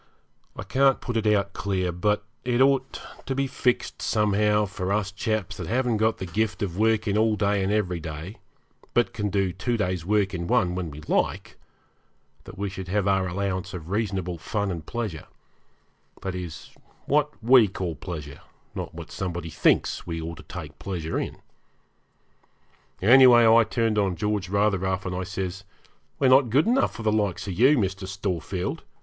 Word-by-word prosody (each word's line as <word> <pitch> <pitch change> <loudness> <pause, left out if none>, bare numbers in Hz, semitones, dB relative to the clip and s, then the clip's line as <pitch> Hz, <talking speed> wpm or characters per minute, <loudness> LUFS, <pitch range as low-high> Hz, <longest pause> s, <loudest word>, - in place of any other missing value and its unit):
I - - -6
can't 135 0 +3
put 120 - -5
it 110 -1 +1
out 100 -2 +2
clear, 95 -2 -1
but 105 +5 0 0.2
it 125 -1 0
ought 135 0 +2 0.3
to 135 - -1
be 135 +1 +1
fixed 125 -2 -1
somehow 105 0 +2
for 95 -1 -4
us 100 -1 0
chaps 110 0 -2
that - - -5
haven't 120 -1 +1
got 110 +1 +1
the 95 - -5
gift 105 +4 -1
of 90 -4 -3
working 110 0 +2
all 110 -1 +3
day 100 -1 +1
and 95 - 0
every 95 -5 0
day, 80 +6 -7 0.6
but 120 0 +2
can 105 -1 -2
do 95 -3 0
two 120 +6 -1
days' 90 -5 -1
work 100 +1 +1
in 85 -2 -3
one 90 0 +2
when 90 -2 -3
we 75 +1 -10
like, 75 - -1 0.9
that - - -11
we 100 +1 -2
should 95 -1 -7
have 100 +1 0
our 95 -1 +2
allowance 95 0 -3
of 85 0 -8
reasonable 95 -5 -2
fun 100 +2 -2
and 85 -3 -6
pleasure 110 -10 -4 1.0
that 95 - -3
is, 90 -3 -7 0.3
what 150 +1 +2
we 120 -2 +7
called 90 -5 -5
pleasure, 75 -6 -7 0.3
not - - -6
what - - -9
somebody 85 -3 -4
thinks 75 - +1
we 85 -1 -3
ought 80 +1 -6
to - - -11 0.2
take 75 -1 -12
pleasure 80 -2 -3
in. - - -4 1.7
Anyway, 120 +1 +8
I 115 +1 +7
turned 115 -2 0
on 95 -3 +1
George 105 +1 -2
rather 100 0 +2
rough, 95 0 -2
and 90 -1 -3
I 90 0 -3
says, 95 0 -4 0.5
'We're 135 - +3
not 130 -1 +6
good 135 +7 +3
enough 250 +4 +2
for 115 - -7
the 110 - +2
likes 105 -4 0
of 95 - -3
you, 130 - +5
Mr. 95 -3 -1
Storefield. 95 -1 -3
100 Hz, 180 wpm, -25 LUFS, 90-110 Hz, 1.7 s, Anyway